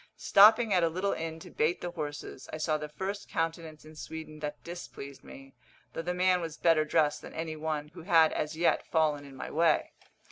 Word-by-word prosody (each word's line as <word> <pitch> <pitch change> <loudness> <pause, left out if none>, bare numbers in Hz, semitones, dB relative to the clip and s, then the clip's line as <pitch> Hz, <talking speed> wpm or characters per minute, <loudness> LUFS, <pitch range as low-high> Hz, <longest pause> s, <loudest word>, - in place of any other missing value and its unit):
Stopping 220 +2 +6
at 180 - +4
a 165 - +3
little 185 +4 -1
inn 160 0 -4
to - - -11
bait 155 +3 0
the 175 - -4
horses, 145 -4 -6
I - - -4
saw 155 0 0
the 150 0 -6
first 195 +6 -5
countenance 165 -2 -3
in 155 0 -13
Sweden 155 0 -8
that 150 0 -6
displeased 170 -5 -9
me, 135 0 -13 0.4
though - - -3
the 175 +2 -2
man 180 0 +3
was 165 -2 -5
better 165 -2 +4
dressed 150 -1 +1
than - - -11
any 160 0 -4
one 155 -1 -3
who 165 +2 -11
had 165 -2 +4
as 150 +1 -3
yet 170 - +2
fallen 150 -3 +1
in 140 -1 -12
my - - -7
way. 165 -1 +2
160 Hz, 210 wpm, -30 LUFS, 150-175 Hz, 0.4 s, Stopping